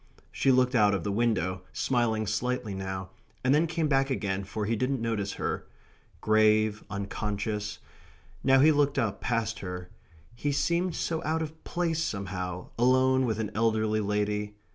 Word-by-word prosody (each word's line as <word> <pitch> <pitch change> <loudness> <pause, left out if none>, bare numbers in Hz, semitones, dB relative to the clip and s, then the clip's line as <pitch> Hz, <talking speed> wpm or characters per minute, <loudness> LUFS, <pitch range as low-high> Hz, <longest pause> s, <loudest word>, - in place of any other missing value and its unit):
She 135 - +2
looked 125 0 +3
out 105 -4 +4
of 95 - -3
the 100 - -1
window, 100 -5 0
smiling 115 -4 +1
slightly 110 0 -1
now, 95 -1 -5 0.3
and 130 +2 +4
then 155 +3 +3
came 160 -1 0
back 135 -1 +2
again, 100 -6 -1
for 105 +2 -3
he 115 +3 0
didn't 130 +4 0
notice 110 -3 -2
her. - - -3 0.5
Grave, 110 0 +3
unconscious... 105 +1 -3 0.7
now 135 0 +5
he 155 +4 +7
looked 145 -1 +2
up, 110 -4 0
past 115 -2 -1
her... 90 -1 -6 0.4
he 145 +5 -2
seemed 170 +4 +1
so 165 -1 -2
out 160 +1 0
of 160 0 -9
place, 165 -2 -1
somehow, 90 - -4
alone 130 +1 +4
with 110 -2 -1
an 110 -2 -3
elderly 110 -1 +1
lady... 105 0 -1
110 Hz, 160 wpm, -28 LUFS, 105-130 Hz, 0.7 s, he